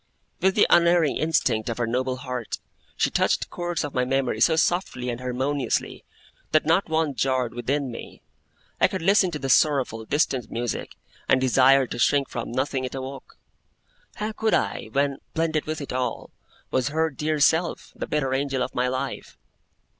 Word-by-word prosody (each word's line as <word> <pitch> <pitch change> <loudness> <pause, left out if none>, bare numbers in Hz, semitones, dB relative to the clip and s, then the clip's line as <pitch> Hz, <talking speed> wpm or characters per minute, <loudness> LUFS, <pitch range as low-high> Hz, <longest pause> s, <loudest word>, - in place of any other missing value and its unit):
With 190 0 +3
the 210 - +5
unerring 170 -3 +4
instinct 135 -8 +1
of 115 - -3
her 120 - 0
noble 130 +2 -1
heart, 125 -3 -5 0.4
she - - +1
touched - - +2
the - - -2
chords 175 -1 -3
of 145 - -5
my 125 - +1
memory 130 -3 0
so 160 +6 +5
softly 160 -7 0
and 120 - -5
harmoniously, 130 +2 -2 0.5
that 155 - +4
not 165 +4 +2
one 160 -2 +1
jarred 130 -3 0
within 130 +3 -2
me; 115 - -10 0.6
I - - +5
could 190 -3 -5
listen 195 0 +4
to 160 - -4
the 135 - -4
sorrowful, 130 -5 +2
distant 135 -2 0
music, 120 0 -4 0.3
and 130 - +5
desire 130 +1 +5
to 120 - -6
shrink 140 +2 +2
from 115 -1 -5
nothing 130 +1 -1
it 130 +1 -4
awoke. 135 0 -8 0.8
How 215 +1 -3
could 220 +1 +1
I, 100 0 -1
when, 140 +2 0 0.2
blended 160 -2 0
with 155 0 -3
it 140 - -6
all, 130 0 -3 0.4
was 130 0 +1
her 160 +2 0
dear 150 +2 -2
self, 160 +4 +1
the - - -5
better 135 -3 0
angel 135 -1 0
of 130 - -5
my 125 +1 +1
life? 130 +2 -4
135 Hz, 175 wpm, -25 LUFS, 125-155 Hz, 0.8 s, the